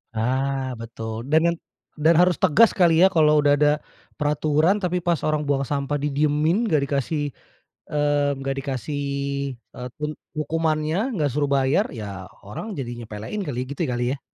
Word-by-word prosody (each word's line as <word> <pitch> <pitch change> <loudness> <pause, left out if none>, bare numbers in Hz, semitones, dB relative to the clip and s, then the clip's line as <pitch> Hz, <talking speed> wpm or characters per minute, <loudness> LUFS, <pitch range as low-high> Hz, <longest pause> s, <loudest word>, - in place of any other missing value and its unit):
Ah 130 +3 0
betul, 115 +1 -6
dan 160 +2 +4
yang 170 - -5 0.4
dan 155 +2 +4
harus 180 +1 +4
tegas 195 +5 +5
kali 170 -2 +4
ya, - - +9
kalau 150 -3 +4
udah 145 0 +4
ada 150 0 +4 0.4
peraturan, 150 +5 +2
tapi 180 -2 -1
pas 170 -2 +1
orang 155 -1 +1
buang 140 -1 +1
sampah 145 0 -1
didiemin 150 +7 +1
enggak 150 -3 +3
dikasih, 140 +2 -1 0.7
eee, 145 -1 +2
enggak 135 0 -3
dikasih, 135 +1 -4 0.6
eee, 125 +2 -10
tun 150 0 -3 0.2
hukumannya, 160 - 0
enggak 150 -7 0
suruh 145 +2 0
bayar, 140 +8 +2
ya 100 -3 -6 0.2
orang 195 - -6
jadi 125 -5 -4
nyepelain 110 - -6
kali, 125 -4 -3
gitu 140 - -5
kali 125 -1 -1
ya. - - -33
145 Hz, 160 wpm, -23 LUFS, 135-160 Hz, 0.7 s, ya